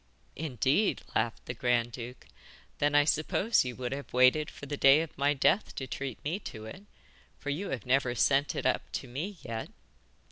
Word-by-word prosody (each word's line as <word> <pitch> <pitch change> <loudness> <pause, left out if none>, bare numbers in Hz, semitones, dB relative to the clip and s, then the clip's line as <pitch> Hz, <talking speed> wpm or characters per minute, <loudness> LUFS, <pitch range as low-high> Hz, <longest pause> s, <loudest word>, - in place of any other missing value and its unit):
'Indeed,' 145 - +1
laughed 115 - -1
the - - -4
grand 120 0 +1
duke; 120 +1 -8 0.5
'then 145 0 +2
I 145 - +7
suppose 175 +9 +2
you 125 -1 -5
would 125 -1 -4
have 140 +1 -5
waited 130 +5 +4
for - - -10
the 145 +1 -3
day 140 +2 +6
of 165 - -6
my 145 +2 +2
death 185 +9 +2
to 135 - -4
treat 130 -1 -5
me 165 +7 -2
to 110 - -8
it, 190 - -10 0.5
for 145 - -4
you 180 +8 -3
have 120 -7 -4
never 125 -1 +2
sent 140 +3 +2
it - - -3
up - - 0
to - - -4
me 165 +11 -5
yet. 115 -1 -5
135 Hz, 190 wpm, -30 LUFS, 125-150 Hz, 0.5 s, I